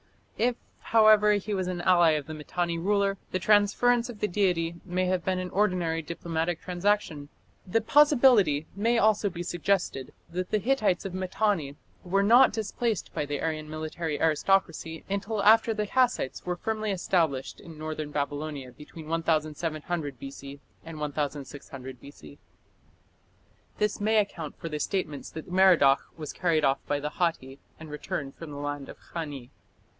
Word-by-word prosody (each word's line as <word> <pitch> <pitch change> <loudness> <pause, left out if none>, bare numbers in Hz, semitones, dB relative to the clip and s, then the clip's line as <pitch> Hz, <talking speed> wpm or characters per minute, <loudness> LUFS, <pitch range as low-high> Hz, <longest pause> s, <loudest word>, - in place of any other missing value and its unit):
If, 245 +1 +2 0.2
however, 215 -2 +5
he 205 +1 -2
was 185 -2 -1
an 180 -1 -3
ally 175 -3 +5
of 150 -2 -2
the 155 - -7
Mitanni 170 +2 -3
ruler, 200 +1 +1
the - - -1
transference 215 +5 +3
of 225 -4 -9
the 210 - 0
deity 175 -4 +1
may 185 0 -1
have 180 -1 0
been 185 -1 0
an 185 0 -4
ordinary 180 -5 +1
diplomatic 165 +1 -3
transaction. 180 -5 -1 0.4
The 225 +5 +1
possibility 240 - +5
may 230 +4 +1
also 215 -2 +3
be 175 -1 -6
suggested 175 -6 -1 0.2
that 180 +1 -3
the 215 - +2
Hittites 215 -6 +1
of 190 - -5
Mitanni 185 -5 -1 0.3
were 195 +2 +1
not 240 +5 +6
displaced 220 0 -2
by 145 - -2
the 145 -1 -3
Aryan 155 -1 -3
military 155 0 -4
aristocracy 165 0 +1
until 200 +1 -2
after 225 +2 +6
the 210 -1 -1
Kassites 245 - 0
were 180 0 -2
firmly 215 +3 -3
established 165 -8 0
in 165 -2 -12
northern 155 -1 -5
Babylonia 145 -2 -4
between 155 +3 -12
1700 155 -2 -2
B.C. 140 +1 -9 0.2
and 160 -1 -9
1600 140 -3 -5
B.C. 75 - -13 1.4
This 210 -1 -1
may 220 +1 +2
account 175 -7 -2
for - - -6
the 150 -1 -4
statements 155 -6 -3
that 160 +2 -9
Merodach 180 -7 +5 0.2
was 155 -3 -6
carried 165 -4 +1
off 135 0 +2
by 145 - 0
the 150 +1 -3
Hatti 145 -7 -2 0.2
and 160 -1 -10
returned 145 -2 -5
from 165 - -10
the 145 - -8
land 145 -1 -4
of - - -10
Khani. 145 -7 -7
175 Hz, 155 wpm, -27 LUFS, 150-205 Hz, 1.4 s, not